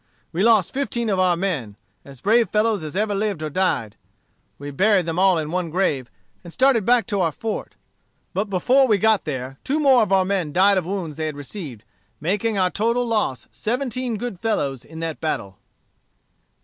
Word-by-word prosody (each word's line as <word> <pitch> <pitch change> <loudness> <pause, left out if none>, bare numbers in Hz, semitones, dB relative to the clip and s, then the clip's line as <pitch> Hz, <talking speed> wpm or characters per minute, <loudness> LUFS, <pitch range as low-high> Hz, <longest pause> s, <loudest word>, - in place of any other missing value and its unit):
We 175 +2 -2
lost 215 -4 +4
fifteen 240 -5 -1
of 190 - 0
our 180 -2 +3
men, 150 - -2 0.3
as 135 -3 -13
brave 225 +3 +3
fellows 215 -3 +1
as 155 +2 -7
ever 210 +1 0
lived 200 -5 -2
or 155 - -3
died. 140 - 0 0.6
We 145 +1 -7
buried 190 +4 +3
them 165 +1 -2
all 190 -2 +4
in 155 -1 -3
one 180 -1 -1
grave, 150 -8 0 0.3
and 170 - -10
started 260 -1 +3
back 240 -3 +4
to 200 0 -1
our 165 -2 +1
fort. 220 +8 -5 0.6
But 200 - 0
before 250 +8 +3
we 215 -4 +3
got 220 0 +2
there, 135 -3 -5
two 285 - 0
more 270 -4 +5
of 210 - 0
our 190 -1 +4
men 185 -6 -1
died 195 +1 +4
of 175 - -7
wounds 180 -6 -4
they 155 -1 -2
had 150 -2 -5
received, 145 - -8 0.4
making 205 +6 -1
our 185 -1 +2
total 235 +3 0
loss 210 - -1
seventeen 250 0 -2
good 220 -4 -5
fellows 140 - -1
in 160 +6 -10
that 165 -2 -4
battle." 100 -11 -3
190 Hz, 190 wpm, -22 LUFS, 155-220 Hz, 0.6 s, more